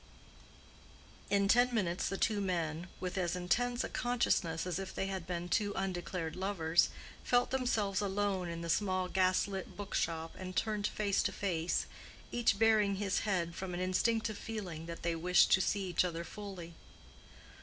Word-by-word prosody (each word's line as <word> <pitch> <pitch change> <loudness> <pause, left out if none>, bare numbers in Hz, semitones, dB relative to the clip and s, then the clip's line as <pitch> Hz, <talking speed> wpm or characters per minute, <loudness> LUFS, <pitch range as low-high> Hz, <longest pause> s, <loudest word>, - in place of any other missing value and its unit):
In 200 -1 +3
ten 245 +4 +5
minutes 180 -4 0
the 195 - -2
two 210 -1 +1
men, 170 -3 -2
with 185 +1 -3
as 175 -1 0
intense 240 +8 +1
a - - -3
consciousness 190 -9 0
as 180 0 -2
if 195 - -6
they - - -1
had 190 -3 -4
been 175 -1 -3
two 205 +2 +1
undeclared 180 -3 -3
lovers, 175 -4 +2 0.3
felt 245 0 +2
themselves 220 -7 +1
alone 195 -2 0
in 170 0 -5
the 170 - -4
small 185 -2 +1
gas 185 +1 +2
lit 195 -2 -6
book 205 -1 -6
shop 165 0 -1
and 185 -1 -6
turned 210 -2 0
face 205 -2 +1
to - - 0
face, 175 -4 -1 0.5
each 235 -4 +2
baring 215 -2 +4
his 195 0 0
head 170 -3 0
from 180 0 -5
an - - -3
instinctive 215 +4 +1
feeling 180 -8 -5
that 170 0 -7
they 170 0 0
wished 180 +2 +4
to 190 - +6
see 195 0 0
each 175 - +3
other 170 -2 -3
fully. 185 -3 -8
190 Hz, 170 wpm, -34 LUFS, 175-205 Hz, 0.5 s, to